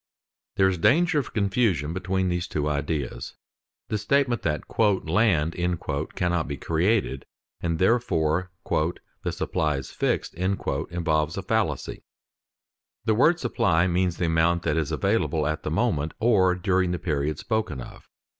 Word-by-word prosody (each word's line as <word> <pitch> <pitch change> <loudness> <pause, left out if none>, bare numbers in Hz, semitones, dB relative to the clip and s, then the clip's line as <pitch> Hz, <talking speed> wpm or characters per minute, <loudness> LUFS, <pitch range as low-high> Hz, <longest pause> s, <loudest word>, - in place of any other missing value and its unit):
_ - - -69 0.5
There 95 - +4
is 95 -2 -1
danger 155 - +4
of 135 - -5
confusion 100 - +1
between 95 +1 -1
these 90 0 -1
two 75 -1 -2
ideas. 75 -4 -3 0.5
The 105 - -1
statement 120 +1 +1
that 75 -2 -1 0.4
"land" 85 -4 +2 0.6
cannot 90 -2 0
be 70 -1 -4
created 85 - 0 0.3
and 85 -1 -1
that 90 - 0
therefore 90 -6 +1 0.2
"the 80 +3 -2
supply 75 -2 -1
is 65 - -7
fixed" - - -1
involves 85 -3 -1
a 95 - -3
fallacy. 105 - -1 1.0
The 110 - +3
word 155 +10 +4
supply 90 - +2
means 90 -1 0
the 85 - 0
amount 85 +1 +2
that 75 -2 0
is 80 -3 -1
available 95 -6 +1
at 75 +1 -1
the - - -3
moment 75 +2 0
or 95 -6 +4
during 90 0 +1
the - - -1
period 75 -3 -1
spoken 110 - -2
of. 60 - -11
85 Hz, 145 wpm, -25 LUFS, 80-100 Hz, 1.0 s, There